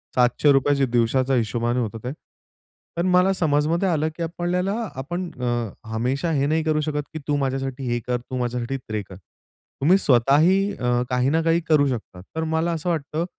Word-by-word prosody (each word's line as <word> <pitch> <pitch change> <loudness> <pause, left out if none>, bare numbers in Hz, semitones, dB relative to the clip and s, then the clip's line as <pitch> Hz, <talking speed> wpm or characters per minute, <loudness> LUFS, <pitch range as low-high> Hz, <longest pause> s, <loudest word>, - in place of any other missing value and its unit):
₹700 135 +3 +3
च्या 140 -1 +2
दिवसाचा 125 +3 +2
हिशोबाने 120 +1 0
होतं 115 -1 -3
ते. 125 - -3 0.8
पण 170 +2 0
मला 180 +1 +4
समजमध्ये 160 +1 +1
आलं 155 -1 +1
की 170 - -4
आपल्याला 175 +3 -1 0.2
आपण 175 +6 -4
अ, 120 -2 -1 0.2
हमेशा 130 +8 -1
हे 140 -2 +1
नाही 160 +2 +1
करू 155 -1 +1
शकत 150 -1 -2
की 155 - -4
तू 145 - +1
माझ्यासाठी 135 -1 -2
हे 120 0 0
कर, 125 0 +1
तू 130 +2 -7
माझ्यासाठी 125 +1 -2
ते 110 -4 -5
कर. 95 - -9 0.7
तुम्ही 175 +7 +5
स्वतःही 145 +6 +4 0.2
अ, 125 0 0
काही 125 +1 +1
ना 160 +2 +2
काही 165 +1 +3
करू 145 -3 +4
शकता. 110 -8 -5
तर 160 - -1
मला 165 +2 +1
असं 165 +2 -2
वाटतं, 160 0 -2
140 Hz, 180 wpm, -23 LUFS, 125-165 Hz, 0.8 s, तुम्ही